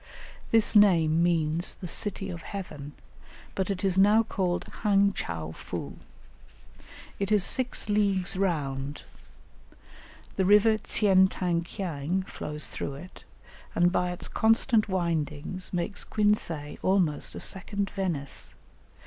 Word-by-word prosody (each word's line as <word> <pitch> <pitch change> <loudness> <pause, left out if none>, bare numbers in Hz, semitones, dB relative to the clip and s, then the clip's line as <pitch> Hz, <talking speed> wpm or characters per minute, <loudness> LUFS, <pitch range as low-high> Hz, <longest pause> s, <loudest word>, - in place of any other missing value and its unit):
This 225 0 +3
name 170 -6 +5
means 165 -1 +1
the 180 - -8
"City 195 +1 -1
of 170 -1 -7
Heaven," 150 -7 -7 0.6
but 190 0 -2
it 195 -1 -3
is 190 -1 +2
now 210 +3 +5
called 185 -5 -2 0.2
Hang 200 -1 +3
chow 80 - -4
foo. - - -7 1.2
It 200 +1 -2
is 210 -3 +5
six 250 +5 +1
leagues 200 -3 +2
round; 145 -7 -2 1.3
the 190 - +2
river 210 +2 +5
Tsien 190 -4 +4
tang 175 -3 -1
kiang 175 -1 -3
flows 150 -5 -3
through 140 - -5
it, 180 +6 -12 0.5
and 175 +1 +3
by 180 -1 0
its 180 - -5
constant 225 0 +2
windings, 170 -1 -2
makes 180 +3 -2
Quinsay 175 -8 -1
almost 185 -6 +1
a - - -5
second 200 +1 -2
Venice. 170 -8 -4
185 Hz, 125 wpm, -27 LUFS, 165-200 Hz, 1.3 s, name